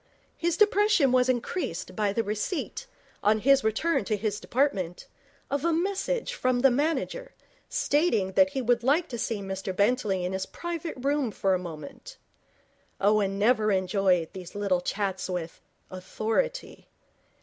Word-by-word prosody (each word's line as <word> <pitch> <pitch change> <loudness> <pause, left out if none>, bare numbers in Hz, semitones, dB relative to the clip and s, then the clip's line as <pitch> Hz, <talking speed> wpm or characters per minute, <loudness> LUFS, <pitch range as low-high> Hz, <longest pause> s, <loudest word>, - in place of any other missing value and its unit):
His 340 0 -1
depression 415 -9 +4
was 255 0 +3
increased 235 - -2
by 210 -1 +1
the 230 +3 0
receipt, 215 - -3 0.3
on 215 +1 +3
his 275 +2 +4
return 220 +8 +1
to 215 0 0
his 210 0 -2
department, 205 -10 -1 0.5
of 280 0 -1
a 335 - +2
message 400 +8 -1
from 255 - 0
the 270 0 +6
manager, 330 - -1 0.3
stating 280 - +1
that 285 +9 +4
he 270 -2 -3
would 240 0 +2
like 295 +8 +2
to 235 - -5
see 220 -2 -2
Mr 190 0 -4
Bentley 200 -3 +1
in 180 - -3
his 190 0 -3
private 340 -1 -5
room 275 0 0
for 195 -2 0
a 185 - +1
moment. 155 -5 -9 0.8
Owen 200 -1 +2
never 215 0 +3
enjoyed 185 -3 +1
these 185 -1 -9
little 200 -3 0
chats 190 0 -2
with 175 -2 -5 0.3
Authority. 220 - -3
220 Hz, 150 wpm, -27 LUFS, 190-290 Hz, 0.8 s, the